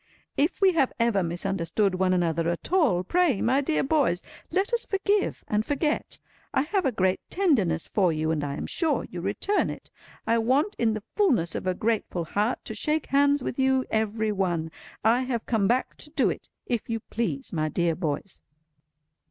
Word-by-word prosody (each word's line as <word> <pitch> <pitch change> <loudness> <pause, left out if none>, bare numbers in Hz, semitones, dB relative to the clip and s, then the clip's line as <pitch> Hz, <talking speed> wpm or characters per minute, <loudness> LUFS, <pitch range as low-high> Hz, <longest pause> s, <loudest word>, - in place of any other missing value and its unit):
If 300 +8 0
we 385 -1 +6
have 310 -7 +2
ever 230 -4 +2
misunderstood 185 +3 0
one 185 0 +1
another 170 -2 +1
at 170 - -4
all, 260 - +3
pray, 330 - +2
my 260 +4 +2
dear 305 +3 0
boys, 275 - +1 0.3
let 390 +5 0
us 475 0 +2
forgive 400 +1 0
and 210 0 +1
forget. 295 +4 -1 0.4
I - - +4
have 370 0 0
a - - +1
great 190 -4 +1
tenderness 220 - +1
for 185 -5 +2
you, 155 0 -1
and 155 -2 -1
I 140 -1 -3
am - - -4
sure 320 -4 0
you - - -5
return 410 - 0
it. - - -8 0.3
I 230 +1 +2
want 275 - +1
in 225 -2 +2
the 215 - -5
fulness 255 - +2
of - - -4
a 185 - +1
grateful 210 -5 -1
heart 210 +8 -1
to 220 - -5
shake 305 +8 -1
hands 285 0 +3
with 250 - -4
you 265 0 +3
every 220 0 0
one. 175 -5 -1 0.3
I 225 +3 +4
have 250 -3 -2
come 215 -5 +1
back 250 +4 0
to - - -10
do 310 - +2
it, - - -8 0.2
if 235 -2 -2
you 225 -1 -2
please, 235 +4 -3
my 155 -2 0
dear 170 +2 +1
boys." 155 +4 -3
225 Hz, 190 wpm, -26 LUFS, 185-285 Hz, 0.4 s, we